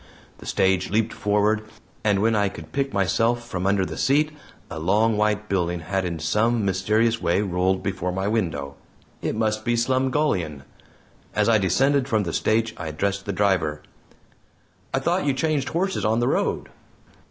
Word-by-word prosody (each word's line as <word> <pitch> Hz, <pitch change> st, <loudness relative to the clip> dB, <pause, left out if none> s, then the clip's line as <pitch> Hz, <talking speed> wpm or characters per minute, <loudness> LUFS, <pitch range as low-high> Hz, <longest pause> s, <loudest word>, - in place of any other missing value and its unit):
The -, -, -11 dB
stage 95 Hz, -1 st, +1 dB
leaped 110 Hz, +2 st, 0 dB
forward, 105 Hz, +1 st, +1 dB, 0.4 s
and 105 Hz, -2 st, +2 dB
when 115 Hz, 0 st, +3 dB
I 100 Hz, -1 st, +2 dB
could -, -, -11 dB
pick 135 Hz, 0 st, -1 dB
myself 115 Hz, +5 st, +1 dB
from 95 Hz, -3 st, -2 dB
under 100 Hz, -1 st, +2 dB
the -, -, -6 dB
seat, 150 Hz, +3 st, +2 dB, 0.4 s
a 80 Hz, -, -6 dB
long 105 Hz, +7 st, +2 dB
white 105 Hz, 0 st, 0 dB
building 90 Hz, -3 st, -1 dB
had 95 Hz, +3 st, -2 dB
in 85 Hz, -2 st, -3 dB
some 105 Hz, +8 st, +1 dB
mysterious 110 Hz, +4 st, +1 dB
way 90 Hz, +4 st, +1 dB
rolled 95 Hz, 0 st, 0 dB
before 95 Hz, -2 st, -2 dB
my 95 Hz, +2 st, -2 dB
window. 80 Hz, -11 st, -1 dB, 0.5 s
It -, -, -2 dB
must 110 Hz, 0 st, 0 dB
be 120 Hz, 0 st, +1 dB
Slumgullion! 130 Hz, -, 0 dB, 0.7 s
As -, -, +2 dB
I 115 Hz, -2 st, +5 dB
descended 135 Hz, +9 st, +2 dB
from 110 Hz, -5 st, +1 dB
the 85 Hz, -3 st, -4 dB
stage 110 Hz, 0 st, +1 dB
I 80 Hz, -, -5 dB
addressed 100 Hz, +6 st, -2 dB
the -, -, 0 dB
driver: 90 Hz, -7 st, 0 dB, 1.1 s
"I -, -, 0 dB
thought -, -, 0 dB
you 140 Hz, -, +2 dB
changed 150 Hz, -1 st, 0 dB
horses 175 Hz, -, -1 dB
on 110 Hz, +3 st, +2 dB
the 120 Hz, -, +1 dB
road?" -, -, -1 dB
105 Hz, 170 wpm, -24 LUFS, 95-115 Hz, 1.1 s, I